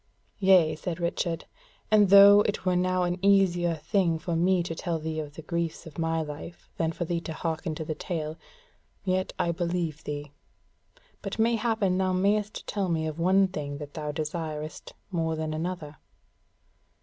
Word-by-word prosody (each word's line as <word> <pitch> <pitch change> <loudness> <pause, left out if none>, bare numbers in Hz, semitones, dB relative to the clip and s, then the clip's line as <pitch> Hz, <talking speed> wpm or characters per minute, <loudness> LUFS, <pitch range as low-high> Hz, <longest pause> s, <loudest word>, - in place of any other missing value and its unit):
"Yea," 185 -5 +5
said 170 +2 -5
Richard, 170 -1 -2 0.5
"and 210 -2 +5
though 200 +1 +9
it 205 -2 -3
were 185 -1 +2
now 185 0 +1
an 180 +1 -2
easier 180 -4 +3
thing 165 +1 +1
for 165 +1 -3
me 180 +1 +3
to 165 - -4
tell 165 0 -2
thee 160 0 -4
of 150 -1 -6
the 160 - -9
griefs 170 0 -3
of 160 0 -10
my 165 0 0
life 150 +3 -9
than 165 -1 0
for 170 +2 -4
thee 170 0 -2
to 165 - -6
hearken 160 0 -3
to 160 - -5
the 155 - -2
tale, 155 -1 -4 0.7
yet 185 -1 0
I 170 - +1
believe 170 -2 -2
thee. 145 -1 -5 0.9
But 195 +1 -5
mayhappen 220 -4 +1
thou 185 -1 +1
mayst 205 +3 0
tell 195 -3 -2
me 160 -2 0
of 155 +1 -4
one 190 +3 +4
thing 145 -6 -5
that 145 -1 -8
thou 150 -1 -4
desirest 155 0 -5 0.2
more 165 -2 0
than 155 0 -3
another." 155 -2 -4
170 Hz, 175 wpm, -27 LUFS, 155-185 Hz, 0.9 s, though